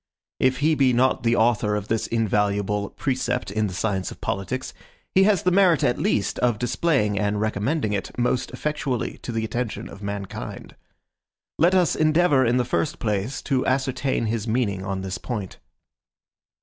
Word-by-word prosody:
If 130 +1 +2
he 155 +2 +4
be 135 -4 +3
not 130 +2 +2
the 120 0 +2
author 110 -2 +2
of 105 0 -3
this 115 0 -1
invaluable 105 -2 0
precept 125 -5 -2
in 105 +1 0
the 95 - -6
science 95 -2 -1
of - - -11
politics, 130 +7 -3 0.4
he 190 +1 +5
has 200 -5 +3
the 180 - +3
merit 180 -6 +4
at 120 - +1
least 100 -1 0
of 120 -3 +2
displaying 120 - +1
and 105 0 0
recommending 110 +3 0
it 100 - -4
most 125 +1 0
effectually 135 -2 -3
to - - -6
the 115 -1 -1
attention 115 +1 -3
of 100 - -11
mankind. 100 +1 -6 0.8
Let 175 +4 +4
us 180 -3 +3
endeavor, 155 -3 +3
in 120 0 +2
the 125 - +1
first 145 - -1
place, 110 +3 -2
to 135 -3 +1
ascertain 130 -1 0
his 110 0 -2
meaning 110 -5 0
on 95 0 -3
this 95 -1 -4
point. 105 -7 -5
120 Hz, 170 wpm, -24 LUFS, 105-130 Hz, 0.8 s, he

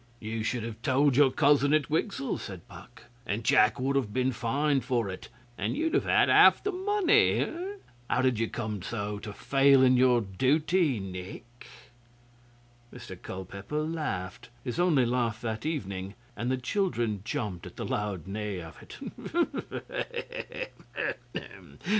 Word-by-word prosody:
'You 110 0 -4
should 115 +1 -1
have 115 0 -6
told 140 0 +3
your 140 0 +6
cousin 145 +1 +4
at 155 -3 +1
Wigsell,' 155 -2 -1
said 95 -4 -8
Puck, - - -13 0.2
'and 110 +1 -2
Jack 110 +2 +4
would 135 +2 0
have 130 -7 0
been 130 +3 +1
fined 135 +4 0
for 120 -7 0
it, 95 - -9 0.3
and - - -1
you'd 320 +1 0
have - - +2
had - - +4
half - - +7
the 410 - 0
money. 390 0 +3 0.6
How 130 - +2
did 130 -4 +2
you 115 - +1
come 110 -4 -4
so 105 0 -4
to 105 0 -7
fail 135 +3 +4
in 130 -1 +5
your 125 -1 +5
duty, 140 - +1
Nick?' 95 +6 -8 1.2
Mr 95 - -9
Culpeper 100 - -5
laughed 150 - -4
his 125 +5 -4
only 160 -8 +4
laugh 120 -2 0
that 110 +3 -3
evening 100 - -4 0.2
and 120 +4 -2
the 130 - +1
children 120 - -1
jumped 105 -6 -4
at - - -12
the - - -4
loud 100 -6 -2
neigh 100 0 -4
of 80 -1 -10
it. - - -4
125 Hz, 145 wpm, -29 LUFS, 105-145 Hz, 1.2 s, half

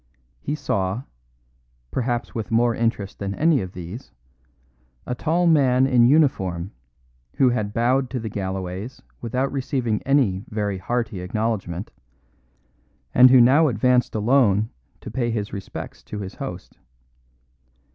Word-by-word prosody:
He 145 - -3
saw 110 -6 -2 0.9
perhaps 120 -1 -2
with 110 -2 -4
more 115 +1 +3
interest 115 -4 -2
than 100 0 -3
any 155 -4 +3
of 90 -1 -7
these 90 +8 -8 1.0
a - - -3
tall 165 +7 0
man 135 -6 +4
in 125 -3 +4
uniform, 95 - +2 0.6
who 130 - +4
had 110 -4 -2
bowed 125 +4 +1
to 125 - -3
the 110 - -5
Galloways 95 +2 -5 0.2
without 125 +3 -1
receiving 125 -5 -1
any 125 -9 +1
very 105 -3 -2
hearty 110 -2 -2
acknowledgment, 100 -2 -3 1.2
and 125 +1 +8
who 130 0 +7
now 135 +7 +6
advanced 125 0 +2
alone 110 -2 +3 0.3
to - - -8
pay 120 -3 -1
his 105 -3 -3
respects 100 -2 -7
to 105 - -7
his 95 -2 -6
host. - - -8
115 Hz, 130 wpm, -23 LUFS, 100-130 Hz, 1.2 s, and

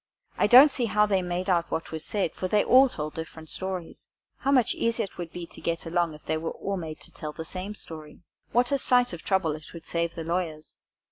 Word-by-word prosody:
I - - +3
don't 265 +4 +9
see 250 -2 0
how 210 -1 +3
they 195 -3 +1
made 180 +1 -3
out 170 -3 +2
what 165 - -3
was 160 -1 -5
said, 195 -6 -1
for 185 - -3
they 205 +2 +3
all 265 +1 +6
told 150 -7 -5
different 160 -1 -8
stories. 185 -3 -5 0.3
How 275 - -2
much 255 -5 +4
easier 230 0 0
it 195 - -9
would 170 -2 -5
be 175 -1 -6
to - - -12
get 170 0 -2
along 165 -1 0
if 150 - -16
they 160 - 0
were 165 +1 -4
all 200 0 -3
made 160 -4 -6
to - - -10
tell 150 -1 -7
the 160 - -7
same 190 +5 -6
story! 155 -3 -10 0.3
What 245 +2 +2
a 280 - +2
sight 245 -4 +4
of 170 - -6
trouble 190 -5 +1
it 155 +1 -8
would 165 -1 -10
save 170 0 -2
the 165 - -4
lawyers! 165 -2 -3
175 Hz, 245 wpm, -27 LUFS, 160-210 Hz, 0.3 s, don't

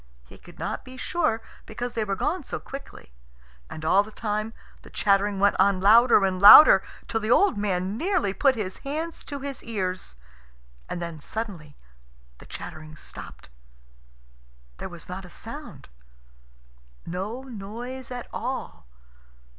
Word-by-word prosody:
He - - -16
could - - -16
not - - -4
be 255 0 -12
sure, 230 -8 -1 0.2
because 240 +2 -5
they 225 - -1
were 200 -2 -2
gone 320 - -1
so - - -5
quickly. 275 - -10 0.6
And 155 - -7
all 190 +5 +5
the 205 - -8
time 215 0 -3 0.3
the - - -14
chattering 200 0 +1
went 200 +1 +4
on 195 0 +4
louder 220 +2 +6
and 185 -1 -1
louder, 210 +9 +11 0.3
till 225 -1 -1
the 215 0 -4
old 395 - +4
man 195 -1 -1
nearly 330 - 0
put 265 +6 +3
his 200 -4 -4
hands 315 +4 -5
to 280 -1 -6
his 275 -2 -6
ears. 185 - -4 0.7
And 175 - -4
then 170 -2 -6
suddenly 170 -6 -6 0.6
the - - -14
chattering 155 0 -9
stopped. - - -11 1.3
There - - -5
was - - -11
not - - -6
a - - -12
sound - - -10 1.2
no 200 +9 -4
noise 245 +2 -7
at 250 -1 -6
all. 255 - -5
215 Hz, 145 wpm, -25 LUFS, 190-255 Hz, 1.3 s, louder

